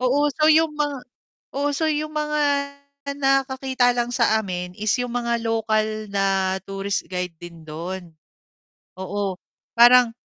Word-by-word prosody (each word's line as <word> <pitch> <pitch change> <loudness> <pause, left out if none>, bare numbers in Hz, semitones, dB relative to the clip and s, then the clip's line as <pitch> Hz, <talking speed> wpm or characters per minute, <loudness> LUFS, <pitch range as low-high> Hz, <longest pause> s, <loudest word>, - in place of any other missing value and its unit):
Oo, 280 +4 +2
so 305 +2 +1
'yong 315 -1 +4
mga 290 -1 0 0.6
oo 285 0 0
so 315 +2 +1
'yong 305 0 -2
mga 300 0 -1 0.8
nakakakita 265 -2 +2
lang 245 0 -1
sa 230 -3 +3
amin 180 -4 -4
is 215 0 +1
'yong 245 -1 -2
mga 235 -1 -1
local 215 -1 0
na 195 -1 +1
tourist 195 0 -3
guide 180 -2 -3
din 170 -2 -11
do'n. 170 +2 -7 0.8
Oo 195 +1 -3 0.4
parang 240 0 +7
235 Hz, 135 wpm, -23 LUFS, 195-270 Hz, 0.8 s, parang